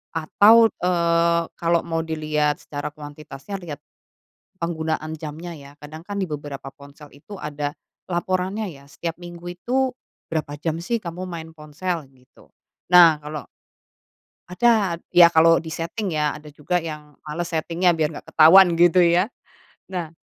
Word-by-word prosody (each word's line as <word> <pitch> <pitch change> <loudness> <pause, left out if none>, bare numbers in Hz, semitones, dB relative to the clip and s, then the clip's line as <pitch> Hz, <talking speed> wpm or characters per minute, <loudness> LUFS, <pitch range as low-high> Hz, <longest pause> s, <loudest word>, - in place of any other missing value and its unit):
Atau, 220 +8 +5
eee, 170 -1 +2 0.2
kalau 170 0 +1
mau 165 -1 -2
dilihat 155 -2 -1
secara 145 -1 -5
kuantitasnya, 150 +5 -9
lihat 155 -4 -9 0.8
penggunaan 160 -1 -3
jamnya 160 +2 -7
ya, 140 -1 -13
kadang 155 +2 -10
kan 200 +1 -5
di 190 - -1
beberapa 145 -2 -7
ponsel 145 0 -14
itu 195 +7 -11
ada 145 -1 -4 0.4
laporannya 185 +4 -1
ya, 140 -5 -11
setiap 165 +3 -6
minggu 175 0 -10
itu 255 +6 -1 0.3
berapa 155 -2 -3
jam 160 0 -2
sih 230 +5 -1
kamu 180 -1 -7
main 165 -3 -7
ponsel 155 +1 -5
gitu. 130 -1 -24 0.4
Nah 170 -4 +8
kalau 150 -1 -6 1.1
ada, 200 -4 +2 0.2
ya 170 -1 +8
kalau 165 +1 +6
diseting 165 +4 -4
ya, 150 -1 0
ada 150 0 -12
juga 160 +5 -2
yang 150 -3 -8
males 165 +3 -4
setingnya 170 +2 +1
biar 155 0 0
gak - - -31
ketahuan 175 +3 +8
gitu 175 +1 +5
ya, 175 +1 +4 0.7
nah 175 -3 -3
165 Hz, 140 wpm, -22 LUFS, 150-180 Hz, 1.1 s, Nah